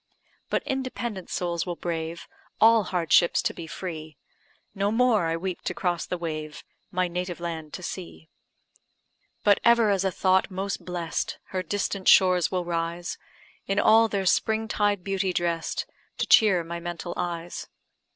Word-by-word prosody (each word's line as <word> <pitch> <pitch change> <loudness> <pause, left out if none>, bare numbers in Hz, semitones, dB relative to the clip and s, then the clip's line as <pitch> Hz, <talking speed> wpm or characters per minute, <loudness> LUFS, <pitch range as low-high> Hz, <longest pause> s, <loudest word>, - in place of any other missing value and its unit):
But - - 0
independent 245 -7 -4
souls 170 -1 -2
will 175 - -2
brave 165 -1 -4 0.3
All 225 -2 +6
hardships 175 -1 +3
to - - 0
be 165 - -8
free; 155 -3 -7 0.6
No 200 0 0
more 225 -6 +3
I 165 0 0
weep 180 +1 -4
to - - -2
cross 175 -3 -1
the 180 - -2
wave, 155 -3 -5 0.3
My 180 0 0
native 175 0 -4
land 165 -3 -5
to 185 - -7
see. 175 -3 -7 1.2
But 205 -1 +5
ever 235 -2 +5
as 195 -1 +1
a 190 - +2
thought 185 +1 +2
most 195 +1 -4
bless'd, 175 -2 -3
Her 185 - -2
distant 195 +1 -2
shores 180 -3 +6
will 180 -2 -2
rise, 170 +1 -3 0.5
In 195 - 0
all 225 +2 +6
their 200 -3 -2
spring 220 +4 +2
tide 205 -3 +1
beauty 195 -1 -1
dress'd. 170 -2 -1 0.3
To - - 0
cheer 195 -6 +5
my 170 +1 -5
mental 175 0 -5
eyes. 170 0 -4
180 Hz, 155 wpm, -26 LUFS, 170-200 Hz, 1.2 s, All